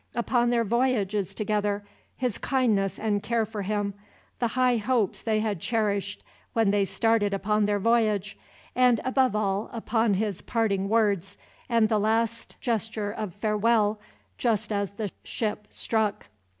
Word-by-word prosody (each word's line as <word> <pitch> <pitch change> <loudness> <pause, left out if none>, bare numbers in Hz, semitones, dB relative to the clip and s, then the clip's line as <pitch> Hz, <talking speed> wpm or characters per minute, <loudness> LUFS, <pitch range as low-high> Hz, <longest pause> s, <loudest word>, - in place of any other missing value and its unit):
Upon 240 0 +2
their 235 -1 +2
voyages 215 -4 0
together, 205 -1 -1 0.3
his 250 -6 -2
kindness 210 -8 +1
and 210 -2 0
care 230 +1 0
for 215 -1 -5
him, 205 0 -1 0.5
the 240 - +2
high 250 -1 +4
hopes 225 -2 0
they 215 -1 +1
had 210 -5 -1
cherished 205 -1 -1 0.3
when 225 -3 +3
they 200 -1 +2
started 205 +1 +1
upon 210 +1 +1
their 205 0 +1
voyage, 215 -2 +1 0.4
and 250 -2 +4
above 260 -3 +2
all 200 0 0
upon 225 -2 +1
his 205 -2 -2
parting 200 -4 0
words, 200 -4 +1 0.3
and 230 -2 +4
the 215 -1 +1
last 225 +2 0
gesture 220 -3 -2
of 210 -4 -5
farewell, 215 0 +2 0.4
just 220 -2 +1
as 200 -1 0
the 205 -1 -5
ship 210 -2 -3
struck. 220 -2 -1
215 Hz, 145 wpm, -27 LUFS, 205-230 Hz, 0.5 s, high